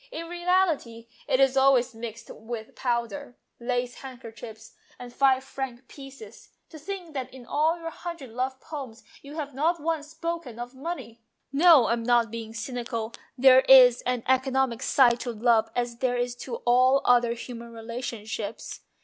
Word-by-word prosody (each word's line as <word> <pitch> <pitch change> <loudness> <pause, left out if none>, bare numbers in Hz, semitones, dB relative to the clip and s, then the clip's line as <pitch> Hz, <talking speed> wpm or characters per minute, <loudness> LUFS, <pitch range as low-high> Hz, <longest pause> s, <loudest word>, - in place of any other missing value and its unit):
In 335 -8 -6
reality 345 -10 0 0.2
it 260 - +2
is 270 -1 +4
always 265 -2 +4
mixed 225 0 -8
up - - -11
with 220 0 -7
powder, 245 +2 -3 0.2
lace 245 0 -2
handkerchiefs, 230 -4 -10 0.2
and 245 -1 -10
five 265 -1 +3
franc 265 -2 -6
pieces. 275 +8 -12 0.2
To 315 - -11
think 360 0 -7
that 265 -3 -4
in 255 -2 -12
all 320 +6 +1
your 330 0 -6
hundred 335 -8 -8
love 260 +3 -3
poems 265 -8 -8 0.2
you 285 +2 -11
have 290 -3 -5
not 325 +6 +1
once 310 -1 -2
spoken 330 -6 -5
of 240 +1 -7
money! 260 -6 -7
" - - -53
" - - -53
No, 305 -3 +7
I'm 235 +1 0
not 235 -1 +2
being 225 -1 -6
cynical: 230 -1 -4 0.2
there 260 0 +7
is 250 -2 +8
an 250 -2 -1
economic 260 -2 +1
side 245 -3 +4
to 245 - -4
love 230 0 +2
as 240 -1 -2
there 245 0 0
is 245 0 -1
to 245 -1 -6
all 255 +3 +4
other 240 -1 +4
human 235 0 -9
relationships. 225 -2 -6
250 Hz, 165 wpm, -26 LUFS, 235-275 Hz, 0.2 s, is